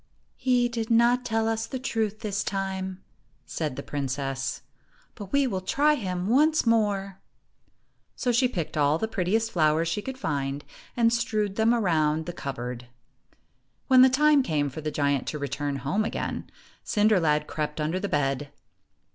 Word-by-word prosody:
"He 250 -2 +2
did 235 -1 -4
not 240 +2 +4
tell 225 -2 0
us 225 0 -1
the 260 - -4
truth 220 -4 -2
this 205 -2 -2
time," 190 -1 -3 0.4
said 150 -5 -3
the 140 - -6
princess, 135 -1 -3 0.5
"but 200 -4 -10
we 280 0 +3
will 195 -7 -2
try 290 +10 +2
him 185 -9 -3
once 300 +8 +3
more." 200 -4 +1 1.0
So 250 - 0
she 245 +2 +3
picked 175 -10 -4
all 150 0 +3
the 220 - -2
prettiest 220 +2 0
flowers 160 -1 +2
she 170 +5 -1
could 265 +4 -6
find, 140 - -3 0.3
and 230 -1 +4
strewed 215 -4 -1
them 220 +1 +3
around 160 -8 +1
the 175 - -5
cupboard. 125 -4 -6 1.0
When 260 -1 +7
the 260 - +8
time 295 +2 +4
came 150 - -1
for 155 - -7
the 155 - -2
giant 140 -2 0
to 150 - -3
return 145 0 -3
home 140 +11 -1
again, 220 - -4 0.3
Cinder 210 -2 +3
lad 150 -2 +2
crept 150 0 -4
under 155 +4 -1
the 200 - -3
bed. 145 -3 -1
195 Hz, 165 wpm, -26 LUFS, 150-230 Hz, 1.0 s, the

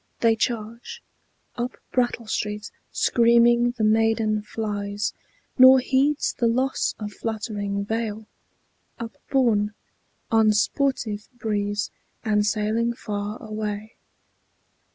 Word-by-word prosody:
They 230 -1 +4
charge 235 - -3 0.5
Up 245 +1 -3
Brattle 240 -2 0
Street. 210 -1 -3 0.2
Screaming 235 0 +4
the 220 - -1
maiden 220 0 +2
flies, 205 -1 -3 0.5
Nor 260 +1 +10
heeds 275 +3 +1
the 235 - +1
loss 255 +3 0
of 210 -1 -6
fluttering 205 -3 -3
veil, 220 0 -3 0.7
upborne 230 -2 0 0.6
On 220 -1 +5
sportive 215 -1 0
breeze, 205 -2 -1 0.3
and 210 -1 +2
sailing 215 +3 0
far 205 -1 -4
away. 215 0 -4
220 Hz, 95 wpm, -24 LUFS, 210-235 Hz, 0.7 s, Nor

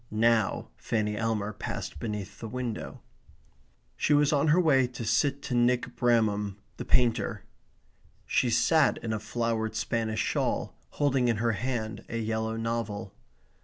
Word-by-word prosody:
Now 110 -1 +2
Fanny 105 -2 -1
Elmer 105 -1 -1
passed - - -5
beneath 105 -3 -5
the 115 - -5
window. 125 -1 -5 0.9
She 150 - +2
was 145 0 +3
on 145 +2 +2
her 155 +4 +5
way 135 -7 +4
to 120 -2 -7
sit 140 +5 +1
to 130 - -4
Nick 120 +1 +2
Bramham 105 -4 +1 0.2
the - - -5
painter. 120 -4 +1 0.8
She 125 - +2
sat 140 +5 +3
in 110 -1 -2
a 110 - -1
flowered 110 0 -2
Spanish 110 0 -1
shawl, - - 0 0.2
holding 135 -4 +2
in 115 -2 +2
her 115 +2 +1
hand 110 0 -3
a 115 - -3
yellow 110 0 -1
novel. 115 -3 -3
115 Hz, 145 wpm, -28 LUFS, 110-125 Hz, 0.9 s, her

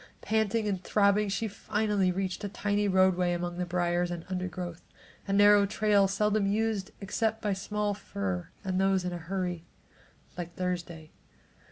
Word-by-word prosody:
Panting 220 0 +1
and 190 -3 -2
throbbing 205 0 +3
she 200 +3 -1
finally 205 -2 0
reached 190 +2 -3
a 205 - -2
tiny 205 +1 0
roadway 185 -2 +3
among 175 0 -3
the 180 - -1
briars 175 0 0
and 175 -1 -5
undergrowth, 180 -2 -4 0.5
a 195 - 0
narrow 205 0 +6
trail 205 -1 +3
seldom 210 +1 +1
used 210 -1 0
except 220 +3 -1
by 210 -2 0
small 205 +2 -2
fur 100 - -4
and 190 -1 0
those 195 -1 +2
in 180 - -2
a 175 - -4
hurry, 180 0 -3 0.8
like 175 0 -6
Thursday. 175 -3 -4
195 Hz, 155 wpm, -29 LUFS, 175-205 Hz, 0.8 s, narrow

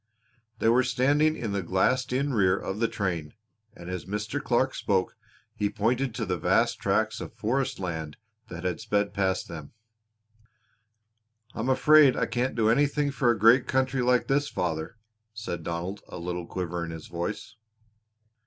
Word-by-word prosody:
They 110 - 0
were 120 +3 +5
standing 140 +5 +2
in 115 -3 -3
the 100 -1 -1
glassed 125 +9 +1
in 135 +2 0
rear 95 -4 +3
of 95 +1 -5
the 115 - +2
train, 90 -9 -3 0.4
and 85 - -11
as 90 -1 -5
Mr. 105 +8 -3
Clark 130 +1 +1
spoke 95 -2 0 0.4
he 105 - -1
pointed 115 +4 0
to 115 -2 -2
vast 95 +6 +1
tracts 110 +2 0
of - - -8
forest 130 +5 -1
land 80 -5 -4 0.3
that 90 +2 -4
sped 105 -2 0
past 95 -2 0
them. 80 -4 -9 1.8
"I - - -8
am 120 +4 -1
afraid 150 +1 +6
I - - +1
can't 120 +3 -1
do 110 -2 +2
anything 145 +4 +2
for 135 -3 +1
a 120 - +3
great 115 +5 +5
country 130 0 +1
like 125 -1 +3
this, 145 +1 +1
father," 80 +4 -3 0.4
said 105 -5 -5
Donald, 85 +4 -4
a - - -8
little 90 0 -4
quiver 90 -2 -3
in 85 - -5
his 80 -1 -8
voice. 85 +4 -5
110 Hz, 160 wpm, -27 LUFS, 90-125 Hz, 1.8 s, afraid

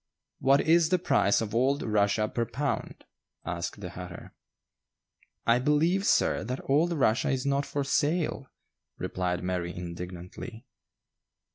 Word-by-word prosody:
"What 135 +1 +4
is 165 0 +4
the 185 - +3
price 100 - +2
of 105 -2 -4
old 135 +5 +2
Russia 105 0 +2
per 120 - -1
pound?" 140 -1 -3 0.4
asked 90 -1 -4
the - - -6
hatter. - - -9 1.1
"I 115 +1 +4
believe, 160 +8 +2
sir, - - +3
that 125 +4 -5
old 155 +6 +3
Rushia 130 -8 +2
is 135 0 -1
not 140 0 +1
for 145 - -2
sale," 145 0 0 0.5
replied 90 -1 -2
Mary 90 -1 -2
indignantly. 90 +7 -7
125 Hz, 130 wpm, -28 LUFS, 100-145 Hz, 1.1 s, What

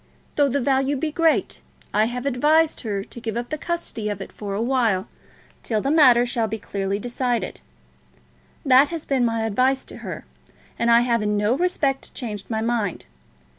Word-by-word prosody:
Though 285 -1 +3
the 280 +2 0
value 270 +2 +1
be 305 +3 -2
great, 325 +1 +1 0.3
I 215 +1 +3
have 245 +3 -4
advised 300 +4 +2
her 200 -3 -3
to 235 - -11
give 225 0 -3
up 240 0 -4
the 310 - -3
custody 335 -12 -3
of 205 -2 -4
it 195 - -8
for 200 -2 -5
a - - -2
while, 230 -6 +1 0.5
till 220 -2 -1
the 275 +6 -1
matter 255 -6 +6
shall 235 -2 -1
be 220 +1 -3
clearly 200 -1 -3
decided. 245 +1 -2 1.0
That 265 +1 +6
has 330 -2 -5
still 275 - 0
been 245 - +2
my 230 -1 0
advice 255 +5 +1
to - - -10
her, - - -7 0.5
and 235 - +2
I 235 0 +6
have 235 -2 +1
in 210 0 0
no 210 +4 +2
respect 285 -5 -1
changed 210 -6 -6
my 220 -1 -1
mind. 225 -5 -1
240 Hz, 190 wpm, -23 LUFS, 220-275 Hz, 1.0 s, matter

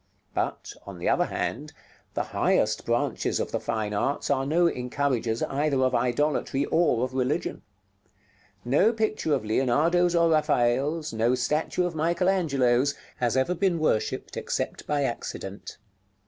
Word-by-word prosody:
But, - - -3
on 100 -2 -8
the 85 - -4
other - - +3
hand, - - -4 0.4
the - - 0
highest - - +1
branches - - 0
of - - -3
the - - -1
fine 105 -1 -2
arts 140 +8 -1
are 135 -1 +1
no 170 +4 +3
encouragers 125 -4 -1
either 140 0 0
of 130 0 +1
idolatry 135 +2 0
or 155 -8 +2
of 130 0 -3
religion. 130 -1 -1 1.0
No 165 - +3
picture 215 -8 0
of 130 - -4
Leonardo's 155 +10 +2
or 170 -1 +4
Raphael's, 150 0 +1
no 115 +3 +2
statue 150 +7 0
of 175 - -2
Michael 170 +3 +1
Angelo's, 140 -7 +2 0.2
has 120 +1 0
ever 130 +7 +2
been 180 -1 +1
worshipped, 155 -9 -1
except - - -3
by 145 -1 +1
accident. 105 -5 -5
140 Hz, 145 wpm, -26 LUFS, 125-165 Hz, 1.0 s, or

